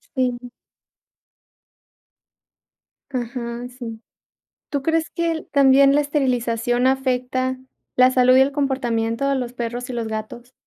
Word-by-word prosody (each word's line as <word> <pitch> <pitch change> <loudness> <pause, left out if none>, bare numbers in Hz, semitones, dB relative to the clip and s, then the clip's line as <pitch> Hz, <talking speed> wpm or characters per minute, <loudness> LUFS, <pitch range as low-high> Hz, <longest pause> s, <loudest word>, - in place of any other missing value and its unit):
Sí. 250 -1 -1 2.6
Ajá, 240 -1 -4
sí. 235 -3 -8 0.7
¿Tú 285 -3 -2
crees 325 +2 0
que 335 0 -1
l 320 - -4
también 275 -1 +5
la 295 - +4
esterilización 245 -4 0
afecta 260 -1 0 0.4
la 255 0 +6
salud 255 0 +5
y - - +7
el 270 +1 +3
comportamiento 255 -3 -1
de 275 - +2
los 245 -2 -3
perros 245 +1 -5
y - - -3
los 235 -2 -3
gatos? 220 +3 -7
255 Hz, 125 wpm, -21 LUFS, 240-270 Hz, 2.6 s, y